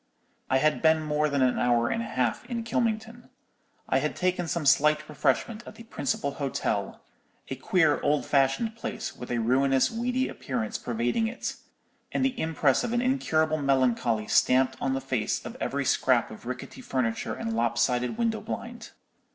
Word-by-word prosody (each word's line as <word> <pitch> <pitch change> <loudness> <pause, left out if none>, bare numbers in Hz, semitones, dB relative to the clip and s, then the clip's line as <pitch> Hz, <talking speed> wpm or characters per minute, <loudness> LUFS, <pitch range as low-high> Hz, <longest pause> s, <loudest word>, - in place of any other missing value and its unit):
"I 130 - +3
had 155 +3 +2
been 160 -1 +4
more 150 0 +1
than 140 -2 +1
an 125 -1 +2
hour 120 -1 +2
and - - -1
a - - -4
half 125 -2 -1
in 235 -2 -4
Kylmington. 230 +1 -2 0.6
I - - +2
had - - -2
taken 180 -1 0
some 165 -1 -2
slight 150 +3 +4
refreshment 150 - 0
at - - -10
the 230 - -11
principal 140 - -2
hotel—a 135 -1 -4
queer, 160 +2 +2
old 145 -3 +1
fashioned 140 - +1
place, 230 - -5
with 125 - -9
a 120 - -1
ruinous, 130 +3 +2
weedy 250 +3 -1
appearance 120 -5 -4
pervading 120 - 0
it, 245 +3 -4 0.6
and 265 - +1
the 265 -1 -1
impress 155 -4 +2
of 240 - -2
incurable 200 - +1
melancholy 125 -5 +1
stamped 130 +4 +3
on 135 0 0
the 135 - -2
face 130 -5 -2
of - - -7
every - - -1
scrap - - +2
of - - -11
rickety - - -6
furniture 115 -4 -2
and 115 - -4
lopsided 120 - +1
window 230 -2 0
blind. 235 -1 -6
145 Hz, 165 wpm, -27 LUFS, -, 0.6 s, been